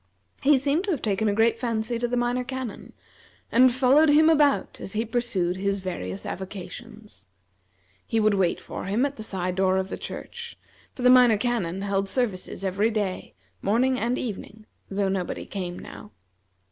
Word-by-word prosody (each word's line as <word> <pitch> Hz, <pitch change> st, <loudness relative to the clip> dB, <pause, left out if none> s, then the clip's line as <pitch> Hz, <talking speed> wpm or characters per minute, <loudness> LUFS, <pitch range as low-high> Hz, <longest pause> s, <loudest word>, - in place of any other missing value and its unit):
He 285 Hz, 0 st, +5 dB
seemed 290 Hz, +7 st, 0 dB
to -, -, -4 dB
have 315 Hz, -9 st, -1 dB
taken 210 Hz, 0 st, 0 dB
a 205 Hz, -, +2 dB
great 225 Hz, +1 st, +3 dB
fancy 230 Hz, -1 st, -1 dB
to 240 Hz, -, 0 dB
the 245 Hz, +1 st, -1 dB
Minor 245 Hz, +1 st, 0 dB
Canon, 260 Hz, -4 st, -6 dB, 0.6 s
and 255 Hz, +2 st, +6 dB
followed 270 Hz, +5 st, +4 dB
him 310 Hz, +2 st, +6 dB
about 295 Hz, -3 st, +2 dB
as 190 Hz, -, -6 dB
he 220 Hz, +2 st, -1 dB
pursued 215 Hz, -7 st, -1 dB
his 200 Hz, +1 st, 0 dB
various 100 Hz, -, -5 dB
avocations. 210 Hz, -, -8 dB, 0.8 s
He 225 Hz, -, +1 dB
would 215 Hz, -1 st, +3 dB
wait 190 Hz, -3 st, +1 dB
for -, -, -7 dB
him 210 Hz, +8 st, +1 dB
at 280 Hz, 0 st, -4 dB
the -, -, -7 dB
side 185 Hz, -4 st, -2 dB
door 190 Hz, 0 st, +2 dB
of 190 Hz, 0 st, -2 dB
the -, -, -5 dB
church, 470 Hz, 0 st, -7 dB, 0.4 s
for 250 Hz, -, -6 dB
the 250 Hz, -, +7 dB
Minor 250 Hz, -4 st, +6 dB
Canon 200 Hz, -6 st, -1 dB
held 195 Hz, -1 st, -1 dB
services 200 Hz, -6 st, -2 dB
every 195 Hz, +3 st, +1 dB
day, 205 Hz, -4 st, -3 dB, 0.3 s
morning 255 Hz, +6 st, +2 dB
and 240 Hz, +3 st, 0 dB
evening, 215 Hz, -1 st, -6 dB, 0.2 s
though 200 Hz, 0 st, 0 dB
nobody 190 Hz, -2 st, -3 dB
came 180 Hz, -3 st, -5 dB
now. 105 Hz, -, -10 dB
220 Hz, 175 wpm, -25 LUFS, 195-250 Hz, 0.8 s, the